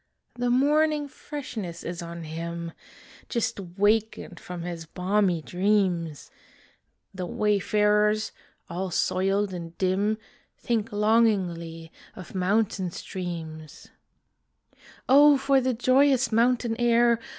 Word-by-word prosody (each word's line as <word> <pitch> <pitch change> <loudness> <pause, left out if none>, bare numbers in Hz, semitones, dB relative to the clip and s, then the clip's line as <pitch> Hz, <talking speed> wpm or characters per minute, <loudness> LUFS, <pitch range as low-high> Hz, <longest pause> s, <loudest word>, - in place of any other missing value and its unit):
The 245 0 -1
morning 295 +3 +2
freshness 250 - -7
is 175 0 -5
on 170 0 -7
him, 170 +1 -5 0.6
Just 235 -4 -1
wakened 205 +1 0
from 180 -1 -7
his 170 -2 -6
balmy 180 -1 0
dreams; 180 -5 0 0.8
The 185 -2 -5
wayfarers, 210 +2 +2 0.4
all 185 +2 -4
soiled 195 +3 0
and 170 -1 -7
dim, 200 +3 +1 0.4
Think 230 -2 -2
longingly 190 -7 +1 0.2
of 185 - -10
mountain 195 0 0
streams: 165 -3 -7 1.2
O 285 +2 +7
for 275 0 +2
the 255 -1 0
joyous 255 0 +3
mountain 235 0 +2
air! 235 -1 +4
205 Hz, 100 wpm, -26 LUFS, 175-235 Hz, 1.2 s, O